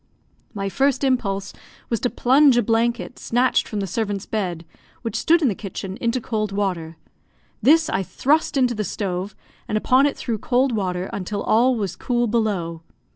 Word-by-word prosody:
My 195 -1 -2
first 275 +7 +1
impulse 205 -7 0 0.4
was 230 - 0
to 250 - 0
plunge 265 +1 +4
a 240 - +3
blanket, 235 +3 0
snatched 245 +2 +1
from 210 -2 -3
the - - -1
servant's 205 0 -3
bed, 180 -6 -3 0.4
which 230 -2 -4
stood 330 +8 +3
in - - +4
the 220 - +1
kitchen, 195 -1 -6
into 235 +2 0
cold 215 -3 -2
water. 180 -5 -2 0.6
This 315 +3 +5
I 190 - 0
thrust 290 - +1
into 250 -2 +3
the 215 -2 -2
stove, 190 -1 -3 0.3
and 215 - 0
upon 255 +6 +4
it 285 - -3
threw 230 -4 -3
cold 255 +4 +1
water, 185 -4 -2
until 200 +1 -3
all 245 +4 +3
was 200 -6 -3
cool 240 -1 0
below. 205 -8 -1
220 Hz, 175 wpm, -22 LUFS, 195-250 Hz, 0.6 s, This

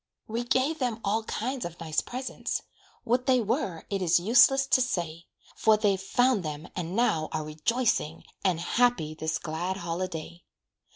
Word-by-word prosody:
We 230 +2 -2
gave 260 +6 +1
them 245 -4 -1
all 210 +3 +1
kinds 250 +4 -3
of 170 0 -7
nice 160 -2 0
presents, 255 +2 -4 0.4
What 250 +3 0
they 255 -1 +5
were, 200 -6 -2
it 195 -1 -1
is 175 -1 +4
useless 250 +7 +5
to 260 -1 +3
say; 170 -9 -2 0.3
For 220 -1 +4
they've 200 -3 +1
found 245 +3 +2
them 155 -1 -5
and 180 0 -4
now 165 -10 +1
are 155 -1 -2
rejoicing, 160 +1 0 0.2
And 185 -4 +2
happy 175 -4 +1
this 160 0 -2
glad 175 +4 -3
holiday. 170 -1 -4
195 Hz, 160 wpm, -28 LUFS, 165-245 Hz, 0.4 s, they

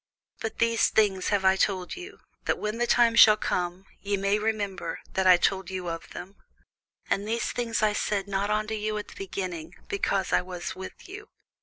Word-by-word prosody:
But 220 - -4
these 230 0 +3
things 200 -4 +2
have 200 -2 +1
I 190 0 +6
told 190 -2 0
you, 370 +3 -10 0.2
that - - +1
when 210 +2 -3
the 240 - +1
time 235 -1 +4
shall 215 -2 +8
come, 180 -2 -2 0.2
ye 200 0 -1
may 200 +2 +1
remember 205 -6 -2
that 190 0 +1
I 180 -1 +8
told 190 0 0
you 185 -2 -4
of 165 0 -6
them. 195 +3 -9 0.7
And 200 +1 -1
these 230 +2 -1
things 230 -2 -1
I 210 -1 +3
said 205 -1 -1
not 200 +1 -1
unto 215 +1 0
you 215 0 -2
at 210 - -6
the - - -13
beginning, 185 -4 -5
because 360 - 0
I - - +4
was 180 0 -6
with 190 0 -9
you. 400 +3 -10
200 Hz, 195 wpm, -27 LUFS, 190-220 Hz, 0.7 s, shall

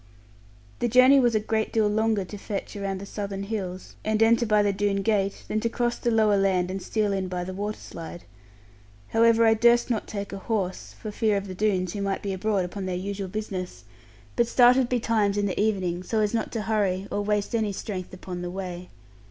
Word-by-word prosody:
The 240 - +1
journey 255 +4 +6
was 240 -3 +3
a - - +4
great 220 +1 -1
deal 220 -2 +2
longer 215 -1 +1
to 205 +3 -8
fetch 200 0 -5
around 195 -1 -3
the 200 - -7
Southern 200 -1 -5
hills, 190 -3 -5
and 215 +1 +2
enter 230 +1 +4
by 210 -1 +4
the 200 -1 +1
Doone 200 0 0
gate, 200 -2 0
than 215 - 0
to 230 +1 0
cross 240 0 -1
the 240 - 0
lower 215 -3 +3
land 185 -2 +1
and 190 0 -4
steal 210 0 0
in 190 -1 -1
by 180 -1 -3
the 185 +1 -6
water 205 +2 -3
slide. 170 +1 -9 0.9
However, 230 0 +4
I 225 - +6
durst 235 +2 +4
not 220 - -1
take 200 -1 -5
a 195 - -5
horse 195 -4 -3
(for 215 - -5
fear 210 -1 +1
of 200 0 -4
the 185 - -6
Doones 185 -3 0
who 205 - -4
might 195 -1 -2
be 200 -1 -2
abroad 195 -1 0
upon 190 +1 -5
their 185 - -2
usual 195 +1 -4
business), 185 -2 -5 0.5
but 235 -1 +2
started 245 +1 +5
betimes 220 -4 +1
in 205 - +1
the 195 - -1
evening, 185 -5 0
so 220 +4 -1
as 210 0 +1
not 225 -2 -1
to 225 -3 -2
hurry, 200 -3 0
or 205 - -1
waste 210 +2 -1
any 220 -3 +1
strength 190 -2 -5
upon 185 -1 -7
the 175 - -4
way. 180 -1 -6
205 Hz, 220 wpm, -26 LUFS, 190-220 Hz, 0.9 s, journey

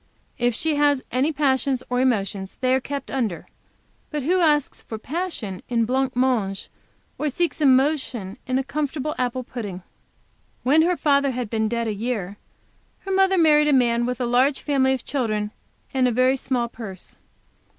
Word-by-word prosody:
If 240 -1 +1
she 315 +1 0
has 290 -2 +3
any 265 +5 +1
passions 270 -3 +1
or 250 0 0
emotions, 200 -6 -1
they 255 0 +2
are 260 - +3
kept 280 +1 -6
under; 225 -10 -2 0.6
but 300 -3 -3
who 360 +6 +2
asks 300 -4 +2
for 220 - -7
passion 255 - -4
in 230 -2 +2
blanc 260 +2 0
mange, 240 -7 0 0.5
or 300 - 0
seeks 340 +3 -1
emotion 260 -6 +2
in 255 0 +1
a 270 - 0
comfortable 300 +1 -2
apple 255 0 -1
pudding? 205 -7 -6 0.8
When 290 +5 +5
her 350 +2 +2
father 280 -2 +3
had 245 -4 -4
been 220 -1 0
dead 235 0 -1
a 215 - -1
year, 205 -3 -3 0.6
her 390 - -5
mother 385 0 +3
married 300 -3 +5
a 295 - +4
man 240 -2 +3
with 250 -1 -3
a 250 - 0
large 255 +4 +2
family 265 -2 +2
of 255 - -9
children 215 -6 -1 0.4
and 260 -1 +3
a - - +1
very 255 +3 +3
small 255 -2 -1
purse. 210 -6 -10
255 Hz, 170 wpm, -23 LUFS, 235-290 Hz, 0.8 s, When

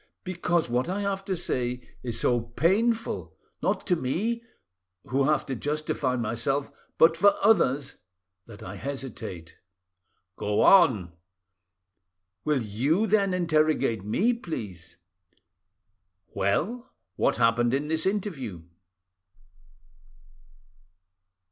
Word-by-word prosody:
"Because 175 -2 0
what 125 +6 0
I 195 +2 -1
have 195 -1 -2
to 190 -2 -2
say 125 -6 -2 0.2
is 120 -2 -4
so 120 -1 +2
painful—not 215 - -1
to 180 - +2
me, 200 - -1 0.6
who 135 +1 +1
have 150 -1 +2
to 135 - -3
justify 145 -1 -1
myself, 120 +4 -1 0.3
but 165 0 +6
for 200 +4 +5
others, 145 -10 +3 0.5
that 105 -3 -11
I 100 +2 -7
hesitate." 115 -10 -6 0.8
"Go 105 0 0
on." 115 - +5 1.3
"Will 150 -5 +1
you 135 - +1
then 200 -2 +2
interrogate 155 - +1
me, 190 - +2
please?" 100 - -7 1.4
"Well, 200 - -1 0.2
what - - +2
happened 115 +1 +3
in 140 +3 0
this 160 +3 0
interview?" 145 - -3
140 Hz, 100 wpm, -27 LUFS, 115-185 Hz, 1.4 s, but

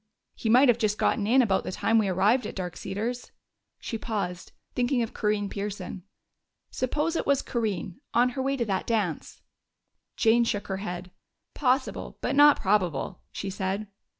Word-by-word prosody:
"He 225 - -3
might 255 +5 +7
have 240 -1 +4
just 210 -2 +1
gotten 210 -5 +1
in 255 +3 +5
about 195 -4 +1
the - - -4
time 225 +4 +2
we 210 - +1
arrived 200 +7 +2
at - - -7
Dark 180 -2 -4
Cedars." 235 +5 -4 0.5
She 225 - -5
paused, 195 -6 -4 0.2
thinking 245 0 +1
of 225 - -5
Corinne 210 -1 0
Pearson. 200 -2 -5 0.7
"Suppose 300 +6 -1
it - - -1
was 280 -1 +3
Corinne 210 -4 -3
on 245 +1 +4
her 265 +2 -4
way 275 +1 0
to 235 - 0
that 195 -3 -2
dance 210 -9 -2 0.4
" - - -57 0.3
Jane 235 0 +4
shook 205 -3 -2
her 190 - -1
head. 180 -2 -6 0.4
"Possible, 260 -1 0
but - - -1
not 290 +1 +7
probable," 185 -4 0
she 195 - -4
said. 195 +2 -2
215 Hz, 175 wpm, -27 LUFS, 195-245 Hz, 0.7 s, might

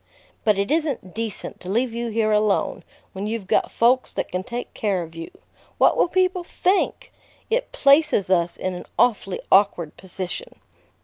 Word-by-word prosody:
"But 210 -3 +3
it 200 +6 -1
isn't 295 - -1
decent 225 -3 -5
to 180 - -9
leave 235 +4 0
you 235 0 -3
here 220 -1 +1
alone, 210 -1 +1 0.3
when 195 +2 -4
you've 220 -2 -3
got - - +1
folks 250 +2 +2
that - - -4
can 180 - -1
take 240 +3 -6
care 195 -5 -1
of 165 0 -11
you. 165 0 -7 0.5
What - - +5
will - - +3
people 365 0 +1
think? 385 +8 0 0.4
It - - 0
places 280 - +3
us 170 -2 +2
in 185 - -2
an 180 - -8
awfully 210 -5 +1
awkward 190 -5 +3
position." 190 - -6
215 Hz, 170 wpm, -23 LUFS, 190-275 Hz, 0.5 s, What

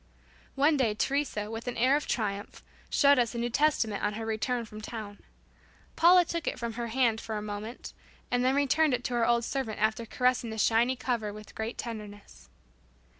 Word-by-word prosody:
One 290 +2 +3
day, 230 -6 +1
Teresa 245 -5 -1
with 225 +2 -6
an 245 - -3
air 255 +4 +4
of 300 - -2
triumph, 205 -3 -3 0.3
showed 285 -2 +5
us 240 -1 0
a - - -2
New 240 +1 -1
Testament 245 -7 +1
on 205 - +1
her 225 +1 -5
return 230 +2 -1
from 215 0 -10
town. 215 -2 -7 0.8
Paula 355 +1 +6
took 335 0 -4
it - - -1
from 235 -2 -4
her 235 +1 -4
hand 230 -2 +1
for 220 -1 -4
a - - -3
moment, 210 +3 -6 0.4
and 245 0 +2
then 260 +1 +3
returned 285 0 +3
it 245 - -6
to 250 - -3
our 235 -1 +2
old 235 -1 +2
servant 250 -6 -3
after 220 +2 0
caressing 250 0 +1
the 220 - -6
shining 235 +4 +3
cover 235 -4 -2
with 215 +1 -11
great 225 +2 -4
tenderness. 210 -3 -8
235 Hz, 195 wpm, -29 LUFS, 220-260 Hz, 0.8 s, Paula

